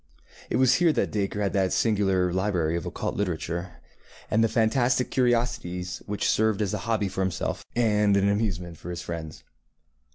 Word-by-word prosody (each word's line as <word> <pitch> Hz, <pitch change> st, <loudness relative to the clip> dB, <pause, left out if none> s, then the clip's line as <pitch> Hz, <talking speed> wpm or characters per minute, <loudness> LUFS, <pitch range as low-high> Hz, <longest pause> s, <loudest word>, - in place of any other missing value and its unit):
It -, -, -1 dB
was 130 Hz, 0 st, +5 dB
here 170 Hz, -2 st, +5 dB
that -, -, 0 dB
Dacre 105 Hz, 0 st, -1 dB
had 100 Hz, -, -1 dB
that 95 Hz, -2 st, +1 dB
singular 95 Hz, -5 st, +2 dB
library 90 Hz, -4 st, 0 dB
of 85 Hz, -, -3 dB
occult -, -, -3 dB
literature, 90 Hz, -2 st, -3 dB, 0.6 s
and 110 Hz, +1 st, +3 dB
the -, -, +4 dB
fantastic 120 Hz, +3 st, +2 dB
curiosities 120 Hz, -8 st, 0 dB
which 105 Hz, 0 st, -1 dB
served 110 Hz, -2 st, +2 dB
as 95 Hz, -, -2 dB
a -, -, -1 dB
hobby 110 Hz, -3 st, +1 dB
for 95 Hz, -, -3 dB
himself, 95 Hz, -1 st, -2 dB
and 105 Hz, -4 st, +3 dB
an 100 Hz, 0 st, +3 dB
amusement 95 Hz, -5 st, -1 dB
for 90 Hz, -, -8 dB
his 85 Hz, -, -5 dB
friends. 80 Hz, -2 st, -6 dB
100 Hz, 170 wpm, -26 LUFS, 90-110 Hz, 0.6 s, was